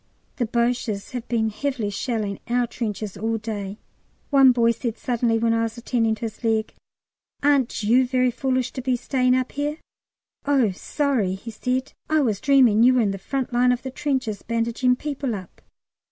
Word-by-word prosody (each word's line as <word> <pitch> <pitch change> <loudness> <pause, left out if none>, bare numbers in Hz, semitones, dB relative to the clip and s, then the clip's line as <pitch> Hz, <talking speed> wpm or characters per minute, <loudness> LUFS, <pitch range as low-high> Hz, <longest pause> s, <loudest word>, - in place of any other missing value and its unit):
The 240 -4 0
Boches 235 -3 -1
have 245 -2 -5
been 220 -2 0
heavily 245 -3 -2
shelling 210 -2 -2
our 245 +1 +2
trenches 215 -4 -4
all 225 +2 -1
day. 210 -2 -5 0.5
One 270 -2 +7
boy 235 -1 +3
said 235 -1 -4
suddenly, 235 -2 0
when 230 0 +2
I 230 - +1
was 225 +1 -3
attending 230 -2 0
to 215 - -20
his 225 0 -6
leg, 220 -1 0 0.7
"Aren't 275 -6 +2
you 245 +4 +4
very 255 0 +2
foolish 255 0 -1
to 260 - -5
be 255 0 +1
staying 255 0 +1
up 255 0 -1
here?" 295 +2 -2 0.7
"Oh, 270 -7 +2
sorry," 225 -2 -1
he 230 +4 -8
said; 255 +4 -2 0.2
"I 310 0 +3
was 220 -7 0
dreaming 255 -6 +5
you 255 +2 +6
were 250 - +4
in 205 -3 +1
the 195 - -5
front 265 +4 -3
line 250 +1 +4
of 250 +1 -2
trenches 260 -9 -2
bandaging 235 +2 +1
people 275 -4 -3
up!" 185 -3 -10
240 Hz, 180 wpm, -23 LUFS, 220-255 Hz, 0.7 s, One